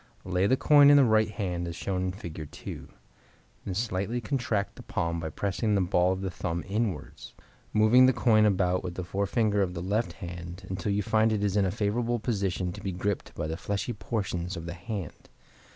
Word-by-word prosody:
Lay 90 +1 +1
the 130 - +3
coin 145 0 +7
in 145 - +8
the 140 - +7
right 110 -1 +3
hand 90 -5 -3
as 85 - -5
shown 95 0 -2
in 90 - -1
Fig. 80 -5 -8
2. - - -8 0.8
Then 95 - -3
slightly 110 +1 -1
contract 115 -3 -1
the - - -10
palm 85 0 -2
by 80 -1 -4
pressing 100 +5 -1
the 100 - +3
ball 90 0 +2
of 95 0 -2
the 95 -1 -3
thumb 85 0 -3
inwards, 100 -6 -3 0.4
moving 115 +4 +6
the - - +6
coin 110 -4 +4
about 90 -2 +1
with 90 -1 -5
the 90 - -4
forefinger 100 +3 0
of 90 -2 -1
the 85 - -4
left 100 -1 0
hand 90 0 -8
until 95 +2 -2
you 100 +1 0
find 110 +3 +3
it 105 -2 0
is 100 -1 0
in 100 -2 +3
a 95 - 0
favorable 115 +4 0
position 95 -6 -1
to - - -9
be 95 - -3
gripped 95 +3 -3
by - - -3
the 80 +1 -3
fleshy 100 +6 -2
portions 95 -5 -3
of 85 - -6
the 85 - -5
hand. 95 -1 -7
100 Hz, 210 wpm, -28 LUFS, 90-110 Hz, 0.8 s, in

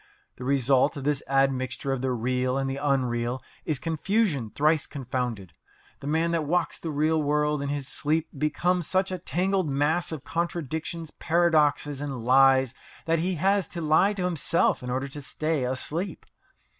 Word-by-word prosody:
The 125 - -8
result 135 +2 +2
of 140 - -5
this 145 -1 +1
admixture 135 -1 0
of 130 - -3
the 130 - 0
real 125 +2 0
and 135 0 -1
the 135 0 -3
unreal 130 -3 0 0.2
is 155 -4 0
confusion 165 - 0
thrice 150 +5 +1
confounded. 125 - -4 0.5
The 140 - -7
man 160 +3 +1
that 165 -2 0
walks 170 +1 0
the 165 - -5
real 155 +1 +1
world 150 0 +1
in 140 - -3
his 140 -2 -3
sleep 155 +2 0
becomes 170 +4 0
such 190 0 +1
a 185 - -3
tangled 185 0 0
mass 150 +6 +1
of 155 -4 -5
contradictions, 165 -1 -3
paradoxes, 150 -4 +2
and 135 -5 -5
lies 130 0 +5 0.3
that 165 0 +2
he 180 +2 0
has 195 +3 +2
to 170 - -6
lie 160 +6 +4
to 195 -3 -3
himself 170 -1 +2
in 125 - -6
order 130 +2 -1
to 145 +2 -6
stay 155 -1 -1
asleep. 155 +8 -3
145 Hz, 170 wpm, -26 LUFS, 135-165 Hz, 0.5 s, lies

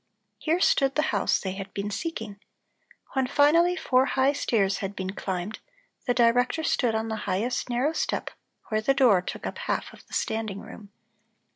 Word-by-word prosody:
Here 330 +2 +1
stood 275 -6 +3
the 305 - +2
house - - +2
they 190 - -3
had 195 0 -7
been 205 +1 -3
seeking. 220 -8 -5 0.7
When 265 -1 +1
finally 330 +6 +4
four 265 -5 +2
high 270 +1 +2
stairs 200 -8 +1
had 200 -1 -4
been 190 0 -3
climbed, 190 +1 -4 0.5
the 245 - +3
Director 245 +6 +3
stood 245 -7 +1
on 220 0 -1
the 220 - -2
highest 220 +8 -1
narrow 250 +6 +1
step - - -2 0.4
where 215 -1 +1
the 270 +5 +2
door 235 -9 +5
took - - -6
up - - -5
half - - -2
of - - -17
the - - -17
standing 220 -3 -2
room. 215 -2 -11
230 Hz, 175 wpm, -26 LUFS, 200-275 Hz, 0.7 s, door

